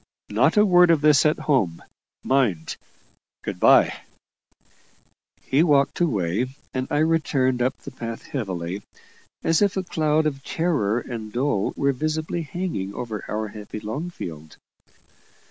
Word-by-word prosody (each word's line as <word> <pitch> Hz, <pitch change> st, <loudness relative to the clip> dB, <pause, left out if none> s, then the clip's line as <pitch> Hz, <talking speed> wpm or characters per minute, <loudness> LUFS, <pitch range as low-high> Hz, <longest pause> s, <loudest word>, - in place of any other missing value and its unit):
Not -, -, +3 dB
a 210 Hz, -, +7 dB
word 180 Hz, -2 st, +6 dB
of 165 Hz, -3 st, +4 dB
this 150 Hz, -1 st, +5 dB
at 150 Hz, -, +1 dB
home, 100 Hz, -, 0 dB, 0.4 s
mind. 115 Hz, -12 st, +1 dB, 0.7 s
Good -, -, -5 dB
bye!" -, -, +5 dB, 1.5 s
He 135 Hz, +3 st, +2 dB
walked 145 Hz, -4 st, +3 dB
away, 105 Hz, -, 0 dB, 0.3 s
and 130 Hz, 0 st, -2 dB
I -, -, 0 dB
returned 145 Hz, -5 st, +1 dB
up 130 Hz, +2 st, 0 dB
the -, -, -10 dB
path 115 Hz, -2 st, -6 dB
heavily, 95 Hz, -6 st, -4 dB, 0.6 s
as 165 Hz, +2 st, +2 dB
if 200 Hz, -1 st, +2 dB
a 190 Hz, -, 0 dB
cloud 155 Hz, -3 st, +1 dB
of 140 Hz, -3 st, -2 dB
terror 145 Hz, -, 0 dB
and 115 Hz, -3 st, -7 dB
dole 120 Hz, -4 st, 0 dB
were 140 Hz, 0 st, +2 dB
visibly 155 Hz, +4 st, -2 dB
hanging 160 Hz, -, -4 dB
over 110 Hz, -4 st, -5 dB
our 110 Hz, 0 st, -3 dB
happy 105 Hz, +1 st, -8 dB
Longfield. 105 Hz, -, -6 dB
135 Hz, 135 wpm, -24 LUFS, 105-155 Hz, 1.5 s, a